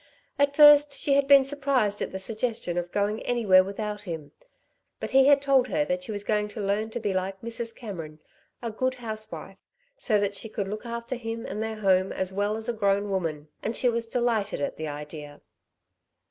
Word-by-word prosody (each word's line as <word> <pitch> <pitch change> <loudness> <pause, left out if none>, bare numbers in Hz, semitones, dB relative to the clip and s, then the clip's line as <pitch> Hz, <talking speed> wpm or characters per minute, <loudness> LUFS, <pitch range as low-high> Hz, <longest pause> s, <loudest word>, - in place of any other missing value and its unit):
At 285 0 +2
first 295 -1 +8
she 280 0 0
had 280 0 +3
been 280 -1 +8
surprised 270 -7 0
at - - -2
the 190 - -4
suggestion 220 -2 -2
of 175 0 -3
going 205 +2 0
anywhere 205 -6 +4
without 210 +2 -4
him, 165 -7 -7 0.7
but - - -5
he 270 0 +6
had 285 -1 +5
told 270 -2 +3
her 295 +2 0
that 270 -1 -1
she 265 -5 -6
was 205 -1 -4
going 210 0 0
to 210 - -9
learn 205 +2 -1
to 230 - -4
be 210 -3 -1
like 190 +1 -2
Mrs. 230 0 -5
Cameron 165 -9 -8 0.4
a 230 - -2
good 255 +4 -1
housewife 220 -3 -6 0.4
so 220 - +1
that 200 0 0
she 220 +2 -5
could 205 -3 -3
look 215 +4 -6
after 235 +1 -4
him 230 -2 -5
and 210 - -4
their 220 0 -3
home 190 -2 +2
as 190 0 -3
well 205 +2 0
as 220 - -4
a 240 - 0
grown 200 -1 +1
woman; 160 -5 -3
and 225 - -2
she 250 - +3
was 230 -1 -2
delighted 230 -4 0
at 145 - -2
the 155 - -5
idea. 150 0 -8
215 Hz, 205 wpm, -26 LUFS, 195-245 Hz, 0.7 s, first